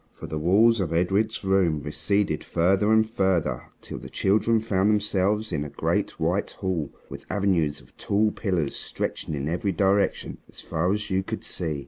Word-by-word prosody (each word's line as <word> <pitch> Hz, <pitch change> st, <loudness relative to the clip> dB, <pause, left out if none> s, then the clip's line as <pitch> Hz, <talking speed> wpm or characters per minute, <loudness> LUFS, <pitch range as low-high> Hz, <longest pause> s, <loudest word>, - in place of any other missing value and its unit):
For -, -, -9 dB
the 80 Hz, -, -4 dB
walls 105 Hz, +8 st, +4 dB
of 90 Hz, -5 st, -1 dB
Edred's 95 Hz, +7 st, 0 dB
room 95 Hz, -6 st, +2 dB
receded 85 Hz, +3 st, 0 dB
further 95 Hz, +5 st, +2 dB
and 110 Hz, 0 st, +4 dB
further, 90 Hz, -, 0 dB
till -, -, -7 dB
the -, -, -10 dB
children 110 Hz, +3 st, +2 dB
found 105 Hz, -2 st, +1 dB
themselves 105 Hz, 0 st, +1 dB
in 75 Hz, -4 st, -1 dB
a 75 Hz, -, -6 dB
great -, -, -1 dB
white 85 Hz, +5 st, 0 dB
hall 90 Hz, -6 st, -3 dB, 0.2 s
with -, -, -9 dB
avenues 90 Hz, -7 st, 0 dB
of -, -, -22 dB
tall 105 Hz, +2 st, +1 dB
pillars 90 Hz, -10 st, -1 dB
stretching 80 Hz, -, -4 dB
in 70 Hz, 0 st, -3 dB
every 90 Hz, +5 st, -1 dB
direction 100 Hz, +3 st, +1 dB
as -, -, -11 dB
far 85 Hz, +3 st, -1 dB
as 105 Hz, 0 st, -2 dB
you 95 Hz, 0 st, +2 dB
could -, -, -6 dB
see. 80 Hz, -5 st, -2 dB
95 Hz, 175 wpm, -25 LUFS, 80-105 Hz, 0.2 s, walls